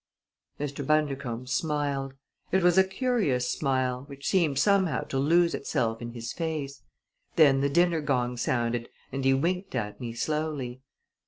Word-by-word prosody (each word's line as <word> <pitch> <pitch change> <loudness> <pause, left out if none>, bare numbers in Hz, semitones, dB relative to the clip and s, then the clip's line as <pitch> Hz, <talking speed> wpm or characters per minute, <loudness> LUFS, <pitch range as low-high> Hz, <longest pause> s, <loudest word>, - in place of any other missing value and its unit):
Mr. 145 0 -3
Bundercombe 135 -5 0
smiled. 140 0 -1 0.4
It 190 0 +2
was 175 -1 +5
a 190 - +7
curious 190 - 0
smile, 130 -2 -1
which 140 -1 -10
seemed 165 -8 +2
somehow 190 +2 +3
to 135 - -3
lose 170 +4 +3
itself 115 -4 -1
in 120 0 -6
his 115 -1 -5
face. 155 -5 -4 0.5
Then 140 -4 +5
the 140 - +2
dinner 170 +1 +3
gong 125 -4 0
sounded 120 -1 -1 0.2
and 135 0 -3
he 135 0 +4
winked 180 +4 -1
at 105 -1 -3
me 120 -2 -4
slowly. 140 -2 -3
140 Hz, 150 wpm, -28 LUFS, 125-160 Hz, 0.5 s, a